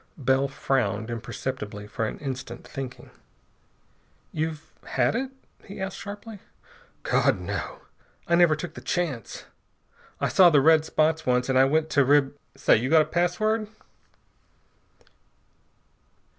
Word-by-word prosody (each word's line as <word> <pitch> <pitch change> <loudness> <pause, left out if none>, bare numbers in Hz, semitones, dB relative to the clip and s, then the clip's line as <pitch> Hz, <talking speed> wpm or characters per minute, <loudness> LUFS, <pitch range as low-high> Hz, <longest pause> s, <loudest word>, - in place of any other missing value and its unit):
Bell 135 -1 +2
frowned 120 -5 -1
imperceptibly 110 -2 -5
for 110 +1 -3
an - - -6
instant, 130 -4 -6
thinking. 130 -2 -8 1.2
"You've 155 0 -4
had - - +1
it?" 260 +2 -2 0.3
he 200 - -10
asked 190 0 -4
sharply. 205 +1 -8 0.6
"God, - - +2
no! - - -5 0.5
I 170 - 0
never 170 -2 +5
took 155 +1 -7
the - - -10
chance! 155 - -3 0.7
I - - +1
saw 185 -2 +6
the 150 -4 +5
red 160 +2 +5
spots 160 0 +1
once, 125 +1 +1
and 130 0 +3
I 135 - +7
went 155 +3 +1
to 145 - +4
Rib 140 +1 +3 0.2
Say! - - +4
You 125 +4 -2
got 160 0 +6
a - - -7
password?" 215 +6 0
150 Hz, 130 wpm, -26 LUFS, 130-175 Hz, 1.2 s, I